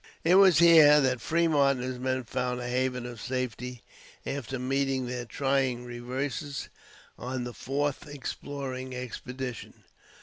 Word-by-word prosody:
It 170 - +4
was 190 -4 +7
here 155 -3 +8
that 130 -4 +1
Fremont 150 -4 +2
and 125 - -5
his 130 -1 -5
men 130 0 -1
found 125 +1 -2
a 120 - -4
haven 125 0 -1
of 120 -2 -8
safety 125 -1 -4 0.4
after 135 -2 -4
meeting 135 0 0
their 125 0 -4
trying 135 -1 0
reverses 130 +3 -4 0.5
on 130 0 -3
the 120 0 -6
fourth 145 +3 -2
exploring 135 -2 -6
expedition. 125 0 -7
130 Hz, 135 wpm, -28 LUFS, 125-140 Hz, 0.5 s, here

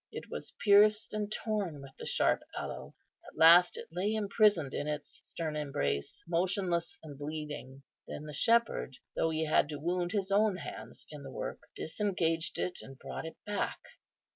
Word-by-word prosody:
It - - -8
was - - -6
pierced 210 +1 +6
and 210 -1 -2
torn 205 -10 -2
with 135 -1 -10
the - - -6
sharp - - +3 0.2
aloe; - - -6 0.3
at - - -14
last 170 +2 +8
it - - -7
lay 195 +6 0
imprisoned 205 - +3
in 145 - -2
its 150 -1 -4
stern 160 -2 -4
embrace, 70 - -2
motionless 175 0 0
and 145 -3 -10
bleeding. 145 -3 -6 0.2
Then - - -6
the 150 -1 -8
Shepherd, 230 - +2 0.2
though 165 - +2
He 160 0 0
had 150 -1 +3
to 150 -2 -5
wound 175 +3 -1
His 195 -2 -1
own 205 -1 +3
hands - - -8
in 150 -1 -8
the 135 - -8
work, 130 - -5 0.2
disengaged 165 -2 -1
it, 180 - -2
and 135 0 -11
brought - - -6
it 165 - -9
back. 205 -1 -1
165 Hz, 170 wpm, -32 LUFS, 150-200 Hz, 0.3 s, last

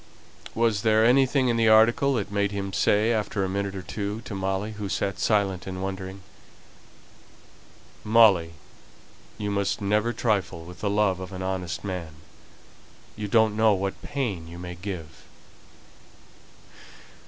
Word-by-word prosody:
Was 115 -3 +1
there 110 0 +4
anything 130 +1 +4
in 120 -1 +1
the 115 -1 +3
article 120 +5 +5
that 100 -3 -3
made 100 0 0
him 100 -1 -4
say, 110 +4 +2
after 105 -2 -1
a - - 0
minute 100 +1 -3
or 95 - -6
two, 105 +3 -4
to 115 - -8
Molly, 95 +2 -2
who 105 -2 -6
sat 95 0 -2
silent 100 -4 0
and 95 0 -5
wondering 95 0 -6 1.8
"Molly, 105 -7 +5 0.8
you 105 -1 -3
must 100 -1 -1
never 105 +3 +1
trifle 95 -8 -1
with 90 +1 -11
the 105 - -1
love 100 -3 +1
of 95 0 -7
an 95 -1 -6
honest 95 -3 -3
man. 90 -6 -5 1.0
You 105 -1 -4
don't 110 0 +3
know 110 -1 +4
what 95 +1 -3
pain 130 - -3
you 85 +1 -10
may 90 0 -7
give." 85 -4 -7
100 Hz, 145 wpm, -25 LUFS, 95-110 Hz, 1.8 s, article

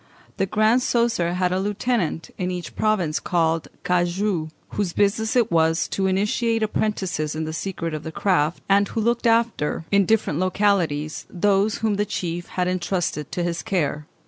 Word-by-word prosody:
The 195 - +1
Grand 215 +5 +3
Coesre 230 -9 +1
had 180 0 +1
a 185 - +1
lieutenant 205 -4 -1
in 180 -1 -1
each 180 -1 -5
province 185 -8 +1
called 165 -2 0 0.2
cagou, 175 -1 0 0.2
whose 195 -4 -2
business 220 +3 +1
it 235 -3 +3
was 160 0 +2
to 190 -1 0
initiate 220 +4 +1
apprentices 190 -8 -1
in 160 - -2
the 155 - -4
secrets 165 -2 -3
of 155 - -5
the 160 - -6
craft, 160 -3 +1
and 200 0 +4
who 225 - -3
looked 235 +2 +1
after, 225 -9 +1
in 200 -2 +4
different 215 -8 +1
localities, 180 -6 0
those 200 +3 +2
whom 210 -2 +1
the 210 - +1
chief 175 -1 -3
had 180 -1 -1
entrusted 175 -4 -2
to 175 - -1
his 170 -1 -2
care. 150 -8 -1
185 Hz, 170 wpm, -23 LUFS, 165-210 Hz, 0.2 s, and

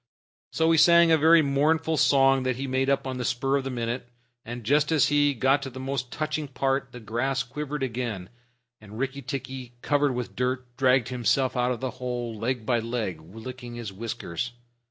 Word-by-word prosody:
So 160 0 +2
he 165 - +4
sang 170 0 +6
a - - +7
very 160 +1 +6
mournful 155 +3 +2
song 135 -2 +4
that 130 -1 0
he 135 +2 -4
made 130 0 0
up 140 0 +1
on 130 -1 -4
the - - -2
spur 135 +3 +1
of 135 - -2
the 135 - -4
minute, 120 0 -3 0.3
and 120 +1 -7
just 145 +7 +2
as 155 -4 +4
he 145 -1 +3
got 135 +4 +3
to 135 - -5
the 130 0 -9
most 130 -2 -3
touching 155 -1 -2
part, 135 +1 -1
the 125 - -9
grass 130 +5 -1
quivered 150 +2 -5
again, 115 -7 -3 0.5
and 105 0 -12
Rikki 135 +2 -3
tikki, 130 -1 -6
covered 145 -3 +2
with 125 -1 -5
dirt, 125 0 -2
dragged 130 -2 +3
himself 130 +1 +1
out 125 0 +1
of 125 - -4
the 130 -1 -2
hole 120 -2 -3
leg 115 +1 -2
by 120 0 +2
leg, 110 -8 -3
licking 120 +7 -9
his 115 -5 -6
whiskers. 115 +1 -4
130 Hz, 195 wpm, -26 LUFS, 120-140 Hz, 0.5 s, a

